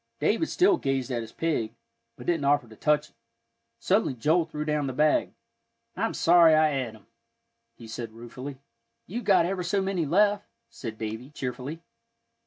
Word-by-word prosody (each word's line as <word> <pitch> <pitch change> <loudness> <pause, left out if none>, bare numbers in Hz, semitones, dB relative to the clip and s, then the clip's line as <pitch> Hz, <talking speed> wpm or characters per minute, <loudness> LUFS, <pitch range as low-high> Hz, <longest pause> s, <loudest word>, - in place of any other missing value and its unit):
David 325 - +1
still 370 0 +4
gazed 135 - -1
at 120 -2 -1
his 115 0 -9
pig, 150 -10 -2 0.4
but - - -11
didn't 165 -4 0
offer 145 -3 +3
to 110 - -14
touch 150 +4 +1
it. - - -40 0.6
Suddenly 130 - +1
Joel 160 +8 +2
threw 150 -2 -5
down 150 -2 0
the 130 - -3
bag. 150 +4 +2 0.6
"I'm - - -1
sorry 170 -2 +6
I 155 0 +4
et 130 -5 -3
'em," 110 - -19 0.7
he 115 - -12
said 115 0 -6
ruefully. 125 +4 -8 0.5
"You've 235 +7 -5
got 185 -4 +5
ever 185 +1 -2
so 180 +3 0
many 190 -5 -1
left," 205 +5 +3 0.2
said 110 -3 -7
Davie, 110 +4 -5
cheerfully. 140 +3 -5
150 Hz, 170 wpm, -27 LUFS, 125-170 Hz, 0.7 s, sorry